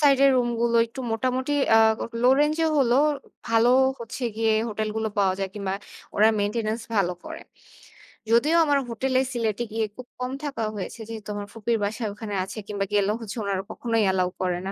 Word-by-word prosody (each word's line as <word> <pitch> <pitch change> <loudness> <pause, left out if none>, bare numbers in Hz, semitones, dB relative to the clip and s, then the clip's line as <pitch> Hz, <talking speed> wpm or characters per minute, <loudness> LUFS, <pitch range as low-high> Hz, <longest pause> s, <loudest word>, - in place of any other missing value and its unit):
Side 280 -3 +5
এর 275 - +7
room 245 -1 +2
গুলো 235 0 +2
একটু 230 +4 -9
মোটামুটি 255 +4 0 0.2
আ - - +8 0.4
লো 250 - +6
রেঞ্জ 300 +1 +2
এ - - +3
হলেও 245 -2 +3 0.5
ভালো 230 +1 +4 0.3
হচ্ছে 235 +2 -6
গিয়ে, 225 -1 +2
হোটেল 215 0 -2
গুলো 220 0 0
পাওয়া 190 -2 +3
যায় 195 -1 -2
কিংবা 195 -2 -2 0.4
ওরা 215 +2 +6
মেইনটেন্যান্স 215 +2 -1
ভালো 180 -2 +2
করে। - - -7 0.9
যদিও 290 +8 +4
আমার 290 -1 +3
হোটেলে 260 +3 0
সিলেটে 230 -2 -1
গিয়ে 220 0 0
খুব 255 - -9
কম 250 +1 -3
থাকা 275 -6 -3
হয়েছে। 205 +3 -6
যেহেতু 215 -2 -7
আমার 205 0 -5
ফুপির 225 +1 0
বাসা 215 +3 -2
ওখানে 205 0 -7
আছে 190 - -8
কিংবা, 200 -1 -2
গেলে 205 0 +3
হচ্ছে 215 0 -6
ওনারা 195 -1 -1
কখনোই 230 -2 0
অ্যালাও 185 -1 +2
করে 180 -1 0
না। - - -2
225 Hz, 190 wpm, -25 LUFS, 205-245 Hz, 0.9 s, আ